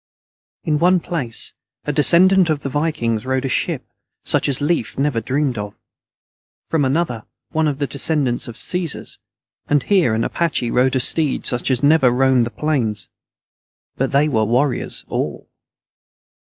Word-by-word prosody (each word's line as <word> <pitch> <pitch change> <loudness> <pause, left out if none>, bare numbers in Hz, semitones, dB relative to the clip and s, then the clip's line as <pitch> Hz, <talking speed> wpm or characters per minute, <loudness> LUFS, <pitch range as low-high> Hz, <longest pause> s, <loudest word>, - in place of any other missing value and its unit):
] - - -50
_In 150 -2 +1
one 180 +2 +4
place, 145 -10 -4 0.3
a 150 - -1
descendant 180 +5 +5
of 150 -2 0
the 140 - -4
Vikings 130 -7 -1
rode 130 0 -1
a - - -1
ship - - -1 0.4
such - - +3
as 135 - +1
Lief 145 -4 -1
never 135 -4 0
dreamed 130 0 -1
of; 105 0 -6 0.9
from 160 -3 0
another, 130 -5 -1 0.3
one 160 0 +1
of 145 -2 -1
the 145 - -1
descendants 140 -2 0
of 120 - -8
the - - -6
Caesars, 180 -4 -4 0.5
and 145 -1 +2
here 180 - +2
an 115 - 0
Apache 155 -7 -1
rode 130 +1 +2
a - - +2
steed 150 +3 0
such 120 +1 +1
as 130 0 0
never 145 -3 +5
roamed 125 -1 +2
the - - -5
plains. 120 -4 -2 0.9
But 135 - -1
they 140 +2 +3
were 115 -7 +1
warriors 125 +4 0
all. - - -4
140 Hz, 165 wpm, -19 LUFS, 125-155 Hz, 0.9 s, descendant